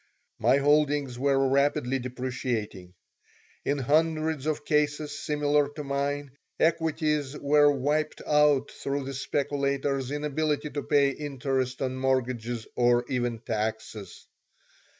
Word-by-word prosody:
My - - +4
holdings 145 -3 +2
were 135 0 +2
rapidly 135 -1 +1
depreciating. 120 -7 -4 0.7
In 145 - 0
hundreds 155 +1 +1
of 150 -1 -2
cases 150 -1 0
similar 145 -1 +1
to 150 - -5
mine 140 0 -2 0.3
equities 155 -3 +1
were 145 +1 +4
wiped 145 +3 -1
out 150 -2 +3
through 140 0 -3
the 135 - -5
speculators' 140 -1 -1
inability 150 +1 -1
to 145 - -3
pay 140 -1 +3
interest 135 -3 -2
on 130 0 -2
mortgages 125 -3 -1
or 120 0 +3
even 120 -3 -1
taxes. 110 -3 -4
140 Hz, 110 wpm, -27 LUFS, 130-150 Hz, 0.7 s, My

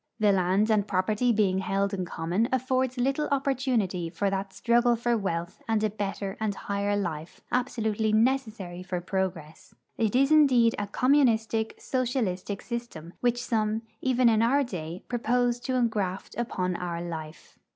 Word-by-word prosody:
The 210 -2 +4
land 195 +3 +2
and 210 -2 +2
property 210 +6 +1
being 200 -4 +2
held 195 +1 0
in 185 -2 -2
common 175 +7 -1
affords 260 0 0
little 275 +4 0
opportunity 255 -11 0
for 195 +4 -1
that 195 0 -3
struggle 240 +3 +3
for 235 +1 0
wealth 185 -2 -3
and 220 -1 +1
a 215 - +1
better 200 -1 -4
and 215 -2 -1
higher 200 +1 -1
life 165 -4 -4
absolutely 220 -4 0
necessary 215 -6 0
for 185 -1 -3
progress. 175 -4 -4 0.2
It 220 0 +1
is 275 +3 +4
indeed 255 -7 +5
a 205 - -2
communistic, 225 -3 +2
socialistic 225 -7 -2
system, 235 -9 -6
which 245 0 0
some, 220 -1 0 0.2
even 255 -1 +3
in 220 -1 +4
our 270 +5 +3
day, 175 -7 -6
propose 245 0 +1
to 255 +1 -2
engraft 210 -6 -1
upon 185 -6 -2
our 175 -1 -4
life. 160 -2 -8
215 Hz, 150 wpm, -27 LUFS, 190-245 Hz, 0.2 s, indeed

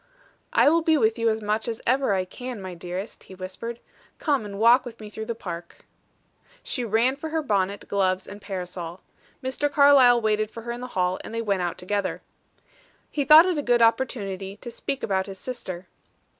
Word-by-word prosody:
"I - - +4
will 330 +3 +5
be 320 -1 +3
with 225 -2 +2
you 230 0 +3
as 220 0 -1
much 215 +2 -1
as 225 -1 -3
ever 260 -3 +2
I 185 -1 0
can, 250 +4 -7
my 185 -1 -6
dearest," 180 +4 -7
he 190 - -12
whispered. 195 +6 -6 0.4
"Come 280 -8 0
and 200 -1 -7
walk 235 +4 +6
with 235 -2 -9
me 210 -1 -9
through 220 +1 -6
the 235 - -2
park." 170 -5 -8 0.8
She 250 - -3
ran 230 +4 +2
for 315 +3 -6
her 320 0 -1
bonnet, 200 -5 -1
gloves 190 -1 +1
and 205 +1 -9
parasol. 180 -2 -6 0.4
Mr. 275 +3 -1
Carlyle 280 -4 +7
waited 215 -1 +1
for 225 +1 -9
her 235 - -4
in 240 +1 -6
the 250 - -5
hall, 180 0 +1
and 225 - -7
they 230 - -1
went 200 -4 0
out 175 -1 -2
together. 195 +2 -2 0.9
He 290 - 0
thought 305 +4 +9
it 360 -5 0
a - - 0
good 240 -3 +3
opportunity 205 -5 0
to 240 - -8
speak 270 +2 -4
about 190 -1 0
his 195 -1 -7
sister. 185 -7 -6
220 Hz, 200 wpm, -25 LUFS, 190-250 Hz, 0.9 s, thought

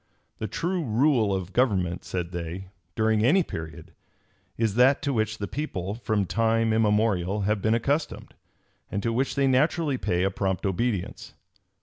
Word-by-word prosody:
The 110 - -2
true 175 - -2
rule 120 -2 +2
of 95 -1 -3
government, 95 -8 +1
said 90 -2 -4
they, 90 +2 -6 0.3
during 110 -1 +2
any 170 +10 +4
period, 80 - -8 0.6
is 110 -3 +1
that 130 +6 +4
to 140 -2 0
which 110 -2 -1
the 100 - -4
people, 100 - -4
from 110 -3 -1
time 115 +2 +1
immemorial, 105 -3 +1
have 105 +1 0
been 110 +3 +2
accustomed, 140 +7 -2 0.6
and 100 -1 -2
to 115 - 0
which 130 +4 0
they 140 - +2
naturally 140 +1 +2
pay 90 +1 0
a 95 - +1
prompt 95 -1 -2
obedience. 100 0 -2
110 Hz, 155 wpm, -26 LUFS, 95-125 Hz, 0.6 s, any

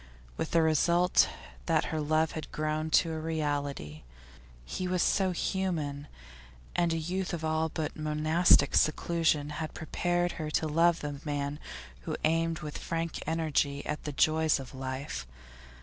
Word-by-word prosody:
With 160 - -3
the 165 -1 +3
result 170 +3 +4 0.4
that 165 -2 +2
her 155 - 0
love 155 +1 +2
had 155 - -6
grown 155 +1 -1
to 165 +1 +4
a 160 - -3
reality. 145 - -2 0.6
He 180 - -3
was 180 -1 +1
so 190 -2 +2
human, 165 -6 -2 0.7
and 170 -1 +2
a 165 - 0
youth 180 +4 -2
of 160 -1 -5
all 160 0 +1
but 155 -1 -3
monastic 155 +3 +4
seclusion 155 -1 +2
had 155 - -5
prepared 175 +2 0
her 155 - -3
to 155 - 0
love 165 +2 +3
the 145 -1 -5
man 145 -1 -2 0.5
who - - -2
aimed 165 +1 +1
with 150 -1 -6
frank 165 0 -3
energy 155 -3 0
at 150 - -3
the 150 - -2
joys 155 +1 +3
of 135 0 -9
life. 130 - -5
155 Hz, 150 wpm, -30 LUFS, 150-165 Hz, 0.7 s, result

